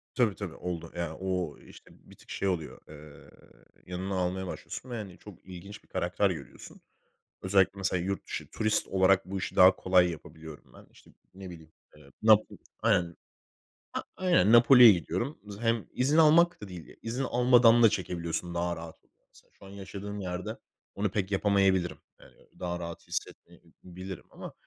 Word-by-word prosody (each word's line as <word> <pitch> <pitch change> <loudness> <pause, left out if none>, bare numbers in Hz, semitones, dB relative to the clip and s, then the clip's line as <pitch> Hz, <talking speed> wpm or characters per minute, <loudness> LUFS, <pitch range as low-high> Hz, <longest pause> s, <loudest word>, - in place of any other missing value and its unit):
Tabii 115 -6 +2
tabii 95 -6 -6
oldu. 85 -2 -6
Yani, 85 -2 -3
ooo, 90 -4 -3
işte - - -17
bir - - -19
tık - - -21
şey 100 - -2
oluyor, 85 -5 -3
eee, 75 -1 -14 0.6
yanına 95 +2 -4
almaya 90 +1 -2
başlıyorsun 130 - -8
ve, 120 - -5
hani, 100 -5 -7
çok 105 -5 -14
ilginç 95 +2 -11
bir - - -29
karakter - - 0
görüyorsun. - - -9 0.6
Özellikle 95 0 +3
mesela 90 -2 -1
yurt 95 +2 -4
dışı - - -5
turist 110 0 0
olarak 95 0 +3
bu 95 +1 -4
işi - - -5
daha 95 +1 +7
kolay 90 -1 +3
yapabiliyorum 80 -1 -11
ben. - - -16
İşte, - - -21 0.2
ne 95 -1 -9
bileyim, 80 -2 -13 0.2
eee, 75 -2 -18
Napo 110 -1 +4 0.3
Aynen 90 -7 +1 0.8
a - - -2
aynen, 175 - +3
Napoli'ye 120 0 +9
gidiyorum. 95 - -3
Z 100 0 -9
hem 115 -1 0
izin 140 +5 +1
almak 165 +1 +5
da 105 - -7
değil, 90 -4 -11
izin 120 +4 -3
almadan 120 -2 +5
da 115 - +8
çekebiliyorsun 85 -2 -4
daha 85 0 -1
rahat 80 -1 -11
oluyor - - -40
mesela. - - -23
Şu - - -17
an - - -12
yaşadığım 100 +1 -8
yerde 90 -1 -5 0.4
onu 100 -1 -1
pek 100 0 -2
yapamayabilirim. 95 -2 +2 0.2
Eee, - - -16 0.3
daha 85 -1 -3
rahat 85 -1 -8
hissetmeyebilirim 90 0 -8
ama, - - -10
95 Hz, 170 wpm, -29 LUFS, 90-105 Hz, 0.8 s, Napoli'ye